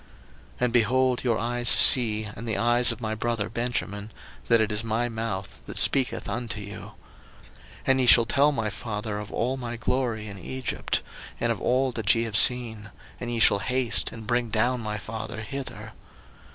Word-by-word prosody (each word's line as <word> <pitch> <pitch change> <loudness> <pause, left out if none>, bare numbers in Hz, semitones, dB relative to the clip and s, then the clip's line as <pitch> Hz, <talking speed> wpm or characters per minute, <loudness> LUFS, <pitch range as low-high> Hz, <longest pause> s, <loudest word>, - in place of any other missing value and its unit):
01:045:012 - - -20
And, 125 -2 +1
behold, 125 +2 +2
your 120 -3 +1
eyes 120 +1 0
see, 110 -4 +5
and 105 +2 -8
the 110 - -1
eyes 120 +1 +3
of - - -8
my 110 -1 -2
brother 110 -2 -2
Benjamin, 110 -3 -3 0.4
that 115 -1 +4
it 110 -1 +1
is 105 +1 -1
my 115 +2 -1
mouth 110 -4 -5
that - - -5
speaketh 135 -2 +3
unto 110 0 -4
you. 100 0 -8
01:045:013 - - -11 0.9
And 130 0 +3
ye 125 - +1
shall 115 -1 +7
tell 140 +5 +3
my 110 -6 -2
father 105 0 -5
of 105 -1 -8
all 130 +3 -1
my 120 -2 -5
glory 120 -2 -1
in 100 -2 -8
Egypt, 130 +7 -2 0.4
and - - 0
of - - -3
all 130 +1 +1
that 110 -3 +2
ye 115 - 0
have 115 -2 -5
seen; 115 -3 +3 0.3
and 120 -1 -5
ye 120 - -2
shall 100 -3 +5
haste 125 +2 0
and 115 -1 -9
bring 120 0 0
down 120 +3 +1
my 105 -1 -4
father 110 +1 -6
hither. 135 +3 -7
115 Hz, 190 wpm, -26 LUFS, 110-125 Hz, 0.9 s, shall